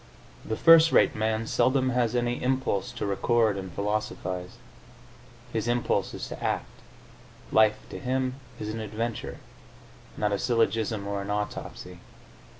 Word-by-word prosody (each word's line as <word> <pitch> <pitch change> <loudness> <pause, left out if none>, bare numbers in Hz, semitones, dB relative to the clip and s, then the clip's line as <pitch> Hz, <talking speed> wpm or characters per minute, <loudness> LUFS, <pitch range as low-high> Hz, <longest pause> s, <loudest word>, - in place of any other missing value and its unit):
The 110 - -3
first 165 0 +7
rate - - +5
man 110 +1 0
seldom 130 +3 +2
has 120 -1 +1
any 120 0 0
impulse 130 -6 0
to - - -4
record 110 +2 +2
and 95 -2 -6
philosophise; 100 -1 -3 1.0
his 110 0 -1
impulse 120 0 0
is - - -5
to - - -7
act; - - 0 0.9
life, 110 -1 +5
to - - -6
him, 130 0 -1 0.2
is 105 - -4
an 110 +1 -4
adventure, 110 +1 -4 0.8
not 105 -1 0
a 100 - 0
syllogism 110 -3 +1
or 100 0 -2
an 100 - -6
autopsy. 105 0 -4
110 Hz, 140 wpm, -27 LUFS, 105-120 Hz, 1.0 s, first